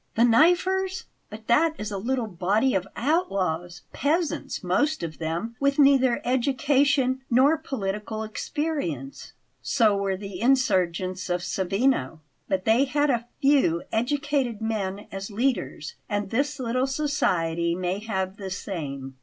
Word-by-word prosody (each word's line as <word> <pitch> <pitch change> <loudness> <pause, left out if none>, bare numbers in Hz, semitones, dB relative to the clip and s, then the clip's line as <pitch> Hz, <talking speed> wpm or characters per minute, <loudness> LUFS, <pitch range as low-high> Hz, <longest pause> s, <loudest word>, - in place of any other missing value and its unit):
"The 230 - +4
'Knifers'! 360 +9 +3 0.3
But 215 +1 -10
that 310 +8 +3
is 210 0 -5
a 200 - -3
little 245 +3 -1
body 205 +6 +1
of 190 0 0
outlaws 185 - -1
peasants, 320 +2 -1
most 305 - +1
of 160 -2 -6
them, 170 +8 -3
with 280 0 +1
neither 270 -4 +4
education 265 +1 +2
nor 265 +6 +5
political 215 -5 -4
experience." 220 - -4 0.3
"So 220 -6 +3
were 195 -1 -1
the 200 -1 -7
insurgents 185 -8 +1
of 175 0 0
Savigno; 185 - 0 0.3
but 185 -1 -1
they 230 +5 +4
had 290 +2 +1
a 235 -1 -1 0.2
few 270 - +3
educated 270 -1 0
men 205 -3 -3
as 195 +1 -6
leaders, 210 - -2 0.2
and 205 -1 -2
this 280 +4 0
little 255 +1 0
society 170 - 0
may 185 +2 -2
have 190 -3 -3
the 195 -2 -6
same. 140 -9 -5
225 Hz, 135 wpm, -25 LUFS, 185-275 Hz, 0.3 s, nor